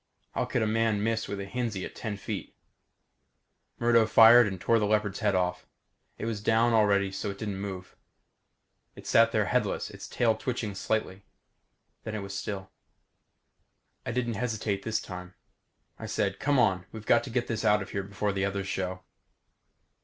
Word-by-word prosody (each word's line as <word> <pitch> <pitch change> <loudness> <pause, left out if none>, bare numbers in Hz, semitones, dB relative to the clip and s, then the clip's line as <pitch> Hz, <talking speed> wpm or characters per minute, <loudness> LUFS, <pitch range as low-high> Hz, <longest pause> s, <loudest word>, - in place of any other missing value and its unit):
How - - -1
could - - 0
a - - +2
man 110 -1 +1
miss 115 0 0
with 100 - -4
a 100 - -4
Hinzie 110 -3 -3
at - - -9
ten 110 -3 -5
feet? 100 0 -6 1.2
Murdo 115 -1 +4
fired 115 +1 +8
and 95 -2 -5
tore 115 +5 +3
the 105 - +1
leopard's 105 -1 0
head 105 -3 +1
off. 90 -1 -1 0.5
It - - -5
was 110 -3 -3
down 115 +2 +3
already 100 -3 +3
so 100 +1 -4
it 100 - -6
didn't 100 -2 -4
move. 95 -2 -6 1.0
It - - -12
sat - - +5
there - - +2
headless, - - -1
its - - -9
tail 115 -2 +2
twitching 110 -3 -3
slightly. 100 -1 -2 0.8
Then 110 -1 -5
it 105 - -4
was 100 0 -6
still. 95 -1 -5 1.3
I 125 - -3
didn't 120 -1 -1
hesitate 110 -4 -1
this 110 +1 -1
time. 90 -1 -9 0.6
I - - -6
said, 100 -1 -1
"Come 145 0 +2
on. 95 -7 +2
We've 110 -1 -9
got - - +4
to - - -7
get 120 0 0
this 110 -2 -3
out 105 -1 +3
of 100 - -12
here 100 - -2
before 100 +1 -2
the 95 0 -1
others 100 -1 -2
show." 95 -1 -3
105 Hz, 180 wpm, -28 LUFS, 95-115 Hz, 1.3 s, fired